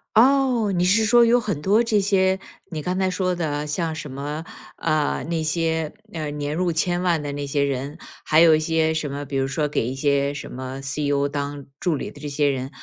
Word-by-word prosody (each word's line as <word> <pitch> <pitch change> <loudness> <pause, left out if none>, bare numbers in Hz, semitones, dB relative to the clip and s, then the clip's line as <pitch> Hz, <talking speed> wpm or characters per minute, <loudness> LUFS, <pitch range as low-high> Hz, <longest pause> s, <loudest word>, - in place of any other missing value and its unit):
哦， 250 -3 +4
你 175 -1 +1
是 215 +4 +4
说 240 +1 +6
有 240 +1 +4
很 205 -10 -3
多 205 +8 +3
这 215 -3 +2
些 190 -1 +2 0.3
你 155 -4 -5
刚 180 +1 -1
才 190 -1 +2
说 185 0 0
的 170 -3 -2
啊， 145 +1 -2
像 160 +1 -2
什 150 -4 -6
么， 145 +4 -5 0.3
啊， 155 -4 0
那 165 +1 -2
些， 160 -1 0 0.2
呃， 155 -2 -3
年 145 +1 -3
入 180 0 +1
千 175 +2 0
万 175 -3 +2
的 145 -1 -4
那 145 0 -4
些 140 0 +1
人， 140 +3 -3 0.3
还 155 +1 +4
有 160 -2 +7
一 - - +1
些 160 0 +1
什 155 -2 -2
么， 140 +1 -5
比 140 0 -6
如 135 0 +1
说 150 +2 -1
给 120 -5 -1
一 130 - -3
些 140 0 +1
什 145 - -7
么 130 +1 -6
CEO 140 +1 0
当 145 -1 -4
助 175 -4 +1
理 - - -5
的 145 - -14
这 145 - -4
些 145 0 +1
人， 135 -1 -1
155 Hz, 255 characters per minute, -23 LUFS, 145-180 Hz, 0.3 s, 有